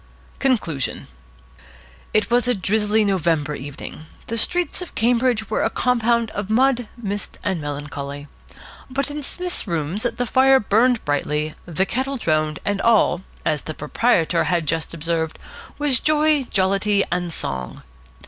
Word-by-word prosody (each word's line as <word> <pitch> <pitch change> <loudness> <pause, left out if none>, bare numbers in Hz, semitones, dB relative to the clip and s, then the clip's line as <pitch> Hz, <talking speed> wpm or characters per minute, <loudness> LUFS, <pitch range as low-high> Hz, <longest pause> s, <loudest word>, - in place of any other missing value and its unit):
CONCLUSION 205 - 0 1.1
IT 215 +1 +1
was 245 +1 +3
a 245 - +3
drizzly 210 +2 +2
November 165 -6 +1
evening. 145 +2 -8 0.2
The 230 - -3
streets 355 - +1
of 360 - -8
Cambridge 235 -1 +2
were - - +1
a - - +2
compound 235 -2 +1
of 205 0 -4
mud, 245 +1 +3
mist, 205 -3 -5
and 190 -5 -1
melancholy. 145 0 -5 0.6
But 275 +2 -2
in 295 +1 -4
Psmith's 355 0 -4
rooms 170 +3 -1
the 245 +1 0
fire 265 +2 +5
burned 230 +3 +2
brightly, 150 +1 -1
the 175 +3 0
kettle 265 +5 -2
droned, 155 -6 0
and 200 -1 0
all, 220 -6 +3 0.2
as 155 -2 +1
the 155 - -6
proprietor 165 +1 +1
had 170 -3 +1
just 160 +1 -1
observed, 160 0 -2 0.4
was 290 -4 +2
joy, 305 -2 +3
jollity, 195 +1 +2
and 175 -1 -1
song. 65 - -4
205 Hz, 140 wpm, -22 LUFS, 160-245 Hz, 1.1 s, fire